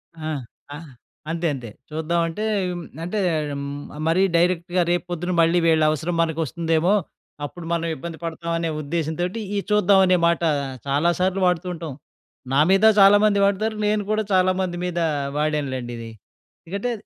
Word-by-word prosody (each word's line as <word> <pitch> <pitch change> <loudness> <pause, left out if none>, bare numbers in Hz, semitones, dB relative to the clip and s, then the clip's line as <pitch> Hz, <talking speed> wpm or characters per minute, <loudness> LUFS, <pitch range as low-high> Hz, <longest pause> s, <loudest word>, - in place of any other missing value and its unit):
ఆ! 155 -1 -6 0.5
ఆ! - - -6 0.5
అంతే 165 +1 -1
అంతే. 120 -4 -7 0.2
చూద్దాం 160 +2 -1
అంటే, 190 +6 -4 0.6
అంటే 205 +5 -2 0.9
మరీ 170 +4 +3
డైరెక్ట్‌గా 175 +1 +2
రేపు 175 +1 0
పొద్దున, 175 +1 -2
మళ్ళీ 165 +2 +3
వీళ్ళ 160 -1 +4
అవసరం 160 +3 -2
మనకు 165 -1 -1
వస్తుందేమో 165 +5 +1 0.5
అప్పుడు 170 +3 -9
మనం 170 0 -1
ఇబ్బంది 165 +3 -7
పడతాం 170 0 -4
అనే 165 -1 -1
ఉద్దేశంతోటి, 170 +6 -2 0.2
ఈ - - +2
చూద్దాం 200 -2 +5
అనే 185 0 +4
మాట 170 0 +1 0.5
చాలాసార్లు 175 +6 +1
వాడుతూ 180 0 0
ఉంటాం. 165 -4 -6 0.6
నా 140 - +4
మీద 195 +3 +4
చాలామంది 205 +1 +6
వాడతారు. 215 +2 0
నేను 210 -1 +1
కూడా 215 0 +1
చాలామంది 185 -1 +1
మీద 175 -1 -2 0.4
వాడానులెండి 140 -5 -2
ఇది. 115 0 -7 0.6
ఎందుకంటే 200 +8 -3
170 Hz, 140 wpm, -23 LUFS, 160-185 Hz, 0.9 s, చాలామంది